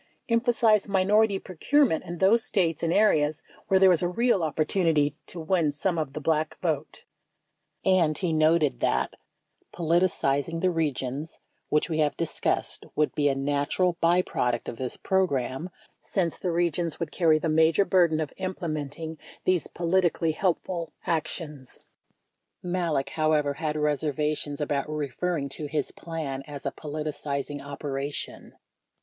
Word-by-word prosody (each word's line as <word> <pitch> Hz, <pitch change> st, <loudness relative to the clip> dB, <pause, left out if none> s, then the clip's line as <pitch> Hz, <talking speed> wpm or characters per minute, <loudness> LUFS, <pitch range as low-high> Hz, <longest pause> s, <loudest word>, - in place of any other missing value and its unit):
—Emphasize 230 Hz, -3 st, +3 dB
minority 200 Hz, +2 st, +3 dB
procurement 190 Hz, -, +1 dB
in 175 Hz, -1 st, -6 dB
those 210 Hz, +6 st, +4 dB
States 170 Hz, -7 st, 0 dB
and 165 Hz, -, 0 dB
areas 155 Hz, -7 st, +3 dB, 0.2 s
where 190 Hz, -, +4 dB
there 190 Hz, -1 st, +7 dB
is 175 Hz, -, +3 dB
a 175 Hz, -, +1 dB
real 230 Hz, +2 st, +2 dB
opportunity 155 Hz, -1 st, +1 dB
to 175 Hz, -, -6 dB
win 165 Hz, -1 st, +1 dB
some 165 Hz, +4 st, -1 dB
of 145 Hz, -4 st, -3 dB
the 155 Hz, -, -4 dB
Black 155 Hz, +1 st, 0 dB
vote. 155 Hz, -4 st, -3 dB, 0.8 s
And 175 Hz, -5 st, +3 dB
he 180 Hz, -4 st, -1 dB
noted 155 Hz, -1 st, +3 dB
that: -, -, +1 dB, 0.6 s
Politicizing 165 Hz, -3 st, +1 dB
the 185 Hz, -, +2 dB
regions, 150 Hz, -2 st, -3 dB, 0.3 s
which 150 Hz, -, +2 dB
we 160 Hz, -2 st, -2 dB
have 150 Hz, -1 st, +1 dB
discussed, 165 Hz, -, -1 dB
would 150 Hz, 0 st, +1 dB
be 145 Hz, -1 st, +2 dB
a 135 Hz, -, 0 dB
natural 145 Hz, +6 st, 0 dB
byproduct 165 Hz, -8 st, +1 dB
of 115 Hz, -, -5 dB
this 130 Hz, -1 st, -4 dB
program, 160 Hz, -4 st, 0 dB, 0.3 s
since 175 Hz, -4 st, -1 dB
the 185 Hz, -, -2 dB
regions 170 Hz, -1 st, 0 dB
would 165 Hz, -3 st, -3 dB
carry 160 Hz, -3 st, +3 dB
the 160 Hz, -, -2 dB
major 160 Hz, +4 st, +4 dB
burden 170 Hz, -5 st, +3 dB
of 155 Hz, -2 st, -3 dB
implementing 160 Hz, -4 st, -4 dB, 0.3 s
these 185 Hz, -2 st, +2 dB
polit 180 Hz, +2 st, +1 dB
ically 165 Hz, -1 st, +1 dB
helpful 175 Hz, -1 st, -2 dB
actions. 150 Hz, -4 st, -3 dB, 0.9 s
38 180 Hz, -, -5 dB
Malek, 165 Hz, -7 st, 0 dB
however, 155 Hz, -2 st, +1 dB
had 150 Hz, +1 st, -3 dB
reservations 150 Hz, 0 st, -1 dB
about 145 Hz, -1 st, -1 dB
referring 150 Hz, +1 st, -2 dB
to 145 Hz, +2 st, -5 dB
his 145 Hz, -1 st, -2 dB
plan 155 Hz, -5 st, -5 dB
as 145 Hz, -1 st, -8 dB
a 140 Hz, -, 0 dB
"politicizing" 145 Hz, -2 st, -4 dB
operation. 140 Hz, 0 st, -5 dB
160 Hz, 145 wpm, -27 LUFS, 145-180 Hz, 0.9 s, there